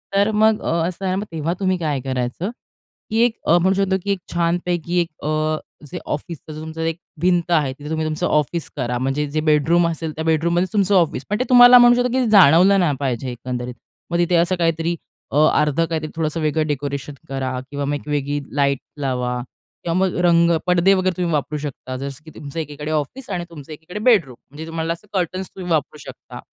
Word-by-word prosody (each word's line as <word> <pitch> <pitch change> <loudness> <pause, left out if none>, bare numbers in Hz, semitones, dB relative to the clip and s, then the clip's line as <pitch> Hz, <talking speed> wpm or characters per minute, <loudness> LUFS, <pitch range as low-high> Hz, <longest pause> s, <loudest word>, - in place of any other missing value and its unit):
तर 200 +2 +3
मग 215 0 +3
असं 170 +3 -1
आहे 185 - 0
ना - - -2
मग 205 - -4
तेव्हा 165 +1 -2
तुम्ही 185 -1 +1
काय 150 -5 -1
करायचं? 130 +7 -3 0.6
की 220 - -1
एक 240 -1 +3
म्हणू 175 +3 +4
शकतो, 195 -1 +1
की 200 - -1
एक 195 - -1
छानपैकी 175 0 -1
एक 170 - -2 0.2
अ, 155 0 0 0.3
जे - - -5
ऑफिस 160 +3 -4
तुमचं 160 +1 -7
एक 165 0 -1 0.2
भिंत 175 -1 +2
आहे. 150 -6 +2
तिथे 145 +1 -8
तुम्ही 160 0 -1
तुमचं 155 -1 -2
ऑफिस 150 +2 0
करा. 125 -3 -2
म्हणजे 135 +4 -1
जे 155 - 0
बेडरूम 165 +3 +3
असेल, 165 -1 -3
त्या 160 - -3
बेडरूममध्येच 170 +4 +1
तुमचं 200 -1 +2
ऑफिस. 165 -7 +1
पण 210 +2 -1
ते - - +2
तुम्हाला 245 0 +9
म्हणू 240 0 +7
शकतो, 245 0 +1
की 255 0 +1
जाणवलं 195 0 +6
नाही 160 -6 +2
पाहिजे 130 -2 -2
एकंदरीत. 125 0 -5 0.4
मग 170 - +1
तिथे 175 0 +2
असं 170 +2 +3
काहीतरी 165 0 0 0.4
अ, 140 - 0 0.2
अर्धं 150 +2 +1
काहीतरी 160 -2 -3
थोडंसं 160 0 -2
वेगळं 155 0 0
डेकोरेशन 140 0 -3 0.2
करा 130 -1 -3
किंवा 140 -1 -3
मग 145 - -1
एक 145 - -8
वेगळी 145 0 -1 0.2
लाईट 140 -2 +2 0.2
लावा 125 -2 -1 0.4
किंवा 170 - -1
मग 185 - -2
रंग, 170 0 +4 0.2
पडदे 180 +2 +4
वगैरे 185 -1 +1
तुम्ही 175 -2 -1
वापरू 150 +1 -1
शकता 135 -3 -6
जसं 140 +2 -7
की 160 - -11
तुमचं 145 +2 -7
एकीकडे 150 -1 -5
ऑफिस 155 - -3
आणि 175 -1 -3
तुमचं 155 -3 -11
एकीकडे 160 +6 -8
बेडरूम. 205 - +3
म्हणजे 150 +3 -8
तुम्हाला 165 0 -2
असं 170 +5 -14
कर्टन्स 185 0 -2
तुम्ही 180 -2 -6
वापरू 150 -1 0
शकता. - - -10
165 Hz, 200 wpm, -21 LUFS, 145-180 Hz, 0.6 s, तुम्हाला